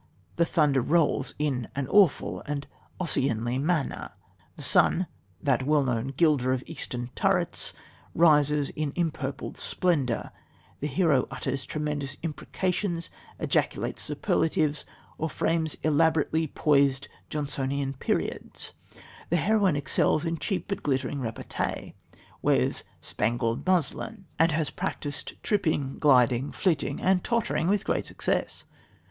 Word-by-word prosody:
The 170 - +4
thunder 150 -5 +3
rolls 160 +4 +1
"in 135 -6 -1
an 140 -2 -2
awful 200 -3 +3
and 145 -1 -3 0.3
Ossianly 125 -7 0
manner"; 155 -1 -1 0.5
the - - -6
sun, 185 - +4 0.4
"that 135 -4 +2
well 145 +2 +3
known 125 -2 -1
gilder 135 -2 +2
of 130 0 -2
eastern 125 -6 -4
turrets," - - 0 0.4
rises 150 -3 +4
in 150 -2 -3
empurpled 155 -5 -3
splendour; 145 -10 0 0.5
the 145 - -2
hero 150 -3 +2
utters 130 -1 -3
tremendous 150 -2 -3
imprecations, 170 +2 -2 0.3
ejaculates - - 0
superlatives 155 -2 0 0.3
or 160 - -1
frames 160 -1 0
elaborately 160 +1 +2
poised, 140 -2 +2 0.2
Johnsonian 140 -2 -2
periods; 130 - -2 0.6
the 170 - +3
heroine 195 0 +3
excels 145 +3 +1
in 165 -1 -2
cheap 195 - -2
but 200 - -3
glittering 135 0 -1
repartee, 115 -3 -4 0.5
wears - - +2 0.2
"spangled 115 - -1
muslin," 185 +4 0
and 165 0 +5
has 155 -1 0
"practised 150 -6 -4
tripping, 155 -10 0
gliding, 130 -2 +4
flitting, 155 -6 0
and 185 -1 +2
tottering, 230 -7 0
with 200 +2 +1
great - - 0
success." - - -2
150 Hz, 115 wpm, -27 LUFS, 135-165 Hz, 0.6 s, and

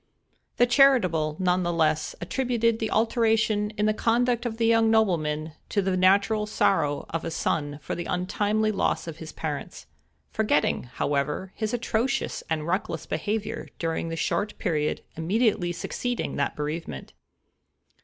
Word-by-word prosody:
The 245 - +6
charitable, 230 - +4
nevertheless, 175 -4 +1
attributed 230 +3 0
the 220 - -1
alteration 220 -2 +2
in 210 - +1
the 215 - +3
conduct 240 +2 +1
of 225 -1 -5
the 230 - +1
young 225 0 +4
nobleman 160 -8 +1 0.2
to 205 - 0
the 190 -1 +1
natural 200 +3 +3
sorrow 150 -8 +1
of 165 0 -2
a 165 - -3
son 145 -2 -1
for - - -3
the 175 - -4
untimely 205 +4 0
loss 210 - 0
of 165 -2 -7
his 160 -1 -8
parents—forgetting, 150 -4 -3
however, 145 +6 -1
his 215 -1 -2
atrocious 235 +1 -1
and 155 -2 -1
reckless 185 +4 -2
behavior 210 0 -3
during 165 0 -2
the 165 - -3
short 205 +5 -1
period 155 -5 -1
immediately 185 +1 +1
succeeding 245 +7 -3
that 140 - -1
bereavement. 150 - -5
195 Hz, 135 wpm, -26 LUFS, 160-225 Hz, 0.2 s, The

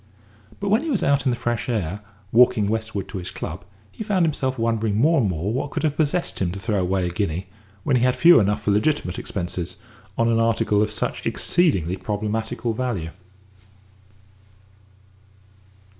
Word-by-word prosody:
But 200 - -2
when 215 +5 +3
he 325 - -4
was 245 -9 0
out 140 -2 +2
in - - +3
the 120 - +1
fresh 120 0 -2
air, 100 -5 -2 0.3
walking 120 -3 +5
westward 110 -3 -2
to 95 - -5
his 90 0 -5
club, 90 -1 -6 0.3
he 220 - -6
found 195 -5 +2
himself 135 -4 -1
wondering 115 -2 0
more 155 +3 +4
and 105 - +1
more 90 +5 -2
what 135 +3 -2
could - - -4
have 150 -2 +1
possessed 155 +3 0
him 90 -2 +1
to 100 - -6
throw 100 -1 0
away 90 0 0
a 90 - -2
guinea 90 -1 -2 0.4
when 130 - +2
he - - 0
had 125 0 +3
few 175 +1 +7
enough 105 0 0
for 105 - +1
legitimate 105 - 0
expenses 90 -1 -4 0.4
on 115 - +2
an 115 -1 +2
article 115 -2 +2
of 105 - +1
such 105 -2 -3
exceedingly 95 - +1
problematical 110 +3 -2
value. 110 -9 -3
110 Hz, 175 wpm, -23 LUFS, 95-130 Hz, 0.4 s, few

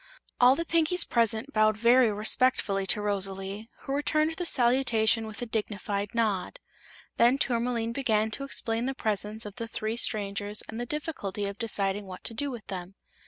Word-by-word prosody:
All 250 +1 +7
the 335 - -3
Pinkies 335 +1 +2
present 230 +3 +1
bowed 215 0 +3
very 235 +1 +5
respectfully 210 -2 +1
to 210 +2 +3
Rosalie, 195 +1 -3
who 270 - -4
returned 305 +2 +1
the 350 +1 -2
salutation 235 -4 +3
with 220 +2 -6
a - - -2
dignified 210 -1 -3
nod. 220 - 0 0.6
Then 240 +3 +5
Tourmaline 235 -3 0
began 220 -4 0
to 275 - -4
explain 230 -4 -2
the 270 - -2
presence 215 -1 -3
of 205 -1 -9
the 230 -1 -4
three 220 +1 -3
strangers 205 -2 0
and 225 - -7
the 240 - -4
difficulty 230 - -4
of 200 0 -6
deciding 205 -3 -1
what 185 -1 -9
to - - -2
do 285 +5 -1
with 240 -5 -7
them. 185 0 -7
225 Hz, 170 wpm, -28 LUFS, 205-250 Hz, 0.6 s, All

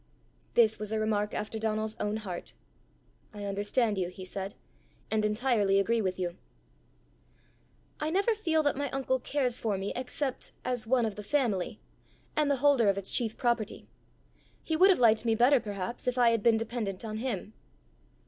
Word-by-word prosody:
This 220 -2 +4
was 210 0 -5
a 220 - 0
remark 210 -1 0
after 215 +1 -3
Donal's 215 0 -1
own 210 +1 -1
heart. 190 -5 -6 0.8
"I 205 -1 -5
understand 205 +2 0
you," 180 - 0
he 185 +1 -9
said, 195 +1 -5 0.6
"and 215 -1 +1
entirely 210 -2 +2
agree 230 +4 +2
with 185 -2 -1
you." 175 -1 -3 1.6
"I 305 - -1
never 395 +7 +2
feel 325 -7 +1
that 290 - +2
my 285 0 -2
uncle 260 -1 0
cares 250 -2 -1
for 210 -4 -1
me 195 +1 -3
except 260 +1 -3
as 245 -3 -1
one 245 -1 +3
of 215 -2 -4
the 210 - -6
family, 215 -7 0 0.6
and 300 -1 +2
the 280 - +3
holder 260 -7 +5
of 195 - +1
its 195 -1 -1
chief 225 -3 0
property. 235 -3 -1 0.8
He 320 - -1
would 370 +5 +6
have 380 - +5
liked 225 -3 +4
me 225 -2 +2
better, 250 +4 +5
perhaps, 205 +2 -5
if 250 0 0
I 240 -2 +5
had 230 -2 +1
been 225 +1 +4
dependent 225 -3 -3
on 215 -1 -4
him." 220 -3 -3
220 Hz, 175 wpm, -30 LUFS, 205-255 Hz, 1.6 s, would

